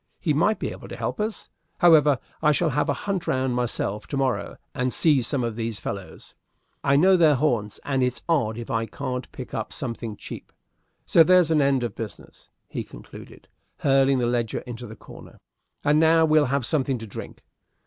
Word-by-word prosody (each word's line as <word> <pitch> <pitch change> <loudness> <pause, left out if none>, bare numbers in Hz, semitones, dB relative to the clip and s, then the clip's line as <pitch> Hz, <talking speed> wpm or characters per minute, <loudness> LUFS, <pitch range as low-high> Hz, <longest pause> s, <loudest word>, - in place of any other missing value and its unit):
He 155 - 0
might 185 +9 +2
be - - -3
able - - -10
to - - -7
help - - -4
us. 215 +1 -4 0.3
However, 150 -5 +5 0.2
I 150 -1 +4
shall 160 +1 +1
have 150 +3 0
a - - +3
hunt 195 -3 -2
round 130 -1 0
myself 120 -4 -2
to 140 - -3
morrow, 135 -2 -1 0.2
and 125 0 -1
see 150 -2 +4
some 125 +2 -1
of 115 -2 -2
these 115 -2 -3
fellows. 100 -2 -7 0.5
I 140 0 +3
know 185 +6 +5
their 160 -5 +5
haunts, 120 -7 -1
and 135 -2 0
it's 125 0 -1
odd 125 -10 +1
if 120 - -6
I 115 0 0
can't 125 +4 -5
pick - - -9
up - - -4
something 115 -2 -5
cheap. - - -9 0.5
So 165 - +5
there's 180 -1 +4
an 155 -2 +4
end 140 -2 +2
of 115 -4 -3
business," 110 -3 -9 0.2
he - - -4
concluded, - - -13 0.3
hurling 135 -1 +3
the 125 - +1
ledger 120 -1 -1
into 120 -1 -8
the 110 - -10
corner; - - -14 0.5
"and 150 +1 +3
now 160 0 +5
we'll 155 -1 +4
have 135 -1 0
something 135 -2 0
to 115 - -8
drink." 105 - -9
135 Hz, 195 wpm, -24 LUFS, 120-155 Hz, 0.5 s, However